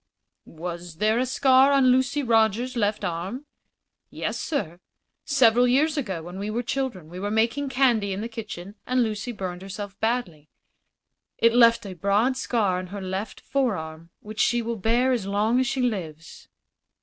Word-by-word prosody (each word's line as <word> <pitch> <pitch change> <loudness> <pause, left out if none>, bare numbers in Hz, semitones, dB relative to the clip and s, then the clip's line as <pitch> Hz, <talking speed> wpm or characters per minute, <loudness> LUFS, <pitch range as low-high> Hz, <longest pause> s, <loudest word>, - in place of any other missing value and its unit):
"Was 170 +1 -7
there 215 +6 +1
a 255 - 0
scar 265 +1 +4
on 270 -2 +5
Lucy 260 +3 +1
Rogers's 230 +2 +2
left 210 -2 0
arm?" 185 - -4 0.6
"Yes, - - -4
sir. 175 - -3 0.5
Several 245 0 +4
years 295 +5 +2
ago, 195 - -3
when 180 +3 -8
we 205 +1 -3
were 235 +3 -2
children, 240 -9 -3
we 175 +3 -9
were 205 +2 -2
making 230 +6 0
candy 245 -6 +2
in 190 +2 -3
the 225 - -3
kitchen 210 -5 -8
and 255 0 +2
Lucy 220 +2 -3
burned 185 -5 -5
herself 195 0 -7
badly. 195 -11 -2 0.9
It 230 0 +4
left 230 -2 +5
a 195 - -6
broad 200 +8 +1
scar 215 -8 0
on 185 - -6
her 200 +3 -7
left 190 +2 -5
forearm, 170 -12 -2
which 215 0 -9
she 240 0 +2
will 230 0 -3
bear 235 +6 +2
as 230 -6 -1
long 210 +5 +1
as 260 - +1
she 270 -1 -1
lives." 165 -9 -4
220 Hz, 170 wpm, -25 LUFS, 190-250 Hz, 0.9 s, on